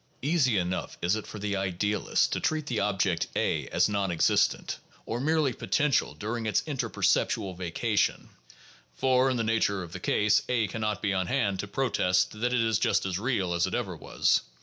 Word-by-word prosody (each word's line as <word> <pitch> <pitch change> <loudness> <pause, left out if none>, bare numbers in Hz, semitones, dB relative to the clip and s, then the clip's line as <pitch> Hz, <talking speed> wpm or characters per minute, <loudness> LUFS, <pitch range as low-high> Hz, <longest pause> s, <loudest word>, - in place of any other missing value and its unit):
Easy 140 -7 +2
enough 90 0 -2
is 90 +4 +2
it 110 - -5
for - - -8
the 100 0 -2
idealist 95 +2 0
to - - -1
treat 155 -1 -1
the 120 -7 -2
object 95 -4 0
A - - 0
as - - +2
non 100 -2 -1
existent 85 -2 +1 0.3
or 115 - -3
merely 150 -1 +1
potential 145 +3 +1
during 110 +2 -4
its 110 - +1
interperceptual 115 - 0
vacations; 95 +4 -1 0.7
for 130 - +3
in 130 - 0
the 115 - 0
nature 110 -4 +1
of 85 - -10
the - - -6
case 105 0 +2
A 120 -3 +2
can 115 - -5
not 105 -1 -2
be 100 -2 +1
on 95 -1 0
hand 100 -8 0
to 100 - -3
protest 90 -6 +1
that 125 +1 +1
it 125 -2 +2
is 110 -2 +1
just - - +1
as 95 -1 -2
"real" 100 -7 0
as 85 0 +1
it - - -3
ever - - -3
was. - - +1
105 Hz, 195 wpm, -28 LUFS, 95-125 Hz, 0.7 s, for